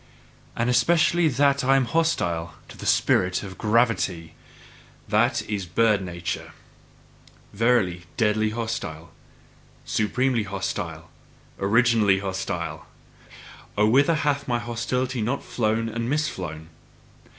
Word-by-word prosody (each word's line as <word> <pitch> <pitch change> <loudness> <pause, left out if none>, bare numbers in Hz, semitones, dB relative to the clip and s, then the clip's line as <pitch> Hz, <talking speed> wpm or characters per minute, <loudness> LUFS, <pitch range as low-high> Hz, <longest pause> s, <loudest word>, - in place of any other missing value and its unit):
And 120 - 0
especially 165 +7 +3
that 140 0 +2
I 135 +1 +4
am 135 -2 +3
hostile 115 - 0
to - - -11
the - - -7
spirit 90 +1 +2
of 95 -2 -9
gravity, 105 -7 +1 0.7
that - - +2
is 100 -3 -4
bird 105 +3 +2
nature: 90 -1 -5 1.0
verily, 100 -6 +1
deadly 110 -1 +2
hostile, 110 -8 -5 0.7
supremely 120 +3 +1
hostile, 100 -2 -5 0.5
originally 110 -1 +3
hostile! 95 -1 -4 0.9
Oh, 105 - +4
whither 140 +7 +4
hath 145 -2 -1
my 120 -2 +1
hostility 120 +2 -2
not 120 +6 -2
flown 115 0 -1
and 115 +1 -3
misflown! 90 - -3
115 Hz, 105 wpm, -24 LUFS, 95-125 Hz, 1.0 s, I